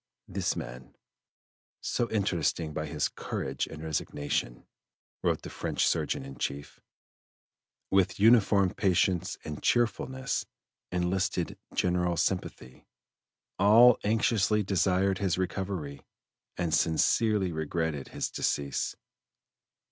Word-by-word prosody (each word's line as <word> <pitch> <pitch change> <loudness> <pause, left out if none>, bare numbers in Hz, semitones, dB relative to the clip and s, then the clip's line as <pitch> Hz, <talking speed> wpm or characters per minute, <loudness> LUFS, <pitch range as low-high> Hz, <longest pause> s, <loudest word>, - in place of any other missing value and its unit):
"This - - -1
man, 65 +1 -8 0.8
so 120 - -1
interesting 85 -6 0
by 80 +1 -3
his 75 0 0
courage 65 0 -4
and 75 - -9
resignation," 75 -5 -2 0.6
wrote - - 0
the - - -7
French - - -1
surgeon 65 - 0
in 70 0 -10
chief, 70 +1 -4 1.1
with 95 -1 +2
uniform 100 -4 +5
patience 90 -2 +1
and 75 -1 -6
cheerfulness, 130 +2 0 0.4
enlisted 90 0 -1 0.2
general 90 -1 +1
sympathy; 65 -10 -3 0.7
all 115 +4 +7
anxiously 105 -1 +2
desired 95 0 +1
his 95 -4 0
recovery 95 -6 -3 0.6
and 85 -3 -1
sincerely 95 +5 +2
regretted 80 -2 -2
his - - -4
decease. 70 -2 -1
90 Hz, 100 wpm, -29 LUFS, 75-100 Hz, 1.1 s, all